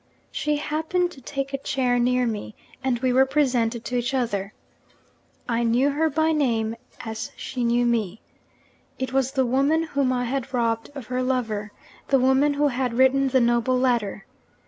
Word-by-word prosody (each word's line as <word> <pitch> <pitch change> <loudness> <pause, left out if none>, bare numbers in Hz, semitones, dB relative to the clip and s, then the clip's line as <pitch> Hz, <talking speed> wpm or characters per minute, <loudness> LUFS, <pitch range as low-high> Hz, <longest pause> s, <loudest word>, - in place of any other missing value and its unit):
She 300 0 -1
happened 320 +4 -1
to 270 - -13
take 275 +1 -4
a 275 - -1
chair 250 -3 0
near 250 +1 +2
me; 210 - -4 0.3
and 260 -2 +1
we 255 +1 0
were 265 +1 +5
presented 245 -5 +1
to 250 - -3
each 245 +2 -1
other. 205 -6 -1 1.0
I 235 -1 0
knew 240 +5 +2
her 315 +3 +1
by 315 +2 +1
name, 230 -7 0 0.3
as 220 -1 -5
she 250 -2 -4
knew 240 +1 +2
me. 225 -4 0 0.8
It 260 0 -4
was 270 0 +1
the 265 -2 +2
woman 275 +6 +2
whom 280 -5 0
I 250 -1 0
had 265 +1 -3
robbed 230 -2 0
of 270 -4 -7
her 255 +2 -2
lover, 225 -5 -1 0.4
the 275 - +4
woman 265 +3 +3
who 290 0 +2
had 250 -2 -2
written 265 +1 +4
the 260 -1 +3
noble 240 +2 +2
letter. 235 -6 0
255 Hz, 175 wpm, -24 LUFS, 235-275 Hz, 1.0 s, were